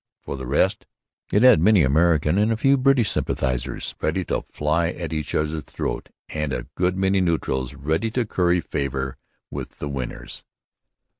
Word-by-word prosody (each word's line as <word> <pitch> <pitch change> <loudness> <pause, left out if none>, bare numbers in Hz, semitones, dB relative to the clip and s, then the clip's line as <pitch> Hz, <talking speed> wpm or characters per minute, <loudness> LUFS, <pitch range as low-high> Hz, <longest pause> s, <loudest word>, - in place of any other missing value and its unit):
For - - -6
the 65 -2 -6
rest, 70 - +1 0.4
it 105 - +3
had 125 -9 +7
many 100 -1 +5
American 80 +4 +3
and 105 +2 +3
a 110 - +1
few 135 +4 +4
British 130 -4 +3
sympathizers 65 0 -2
ready - - 0
to - - -1
fly 75 +3 0
at 85 -2 -5
each 75 -2 -3
others' 75 +1 0
throats - - -4 0.2
and 75 -2 -2
a 60 -2 -3
good 90 +1 0
many 95 0 +2
neutrals 70 -7 -1
ready 80 +10 -1
to 120 +2 -1
curry 90 -3 +1
favour 65 -3 -3 0.3
with - - -7
the 75 - -4
winners. 65 -3 -6
80 Hz, 165 wpm, -23 LUFS, 70-95 Hz, 0.4 s, had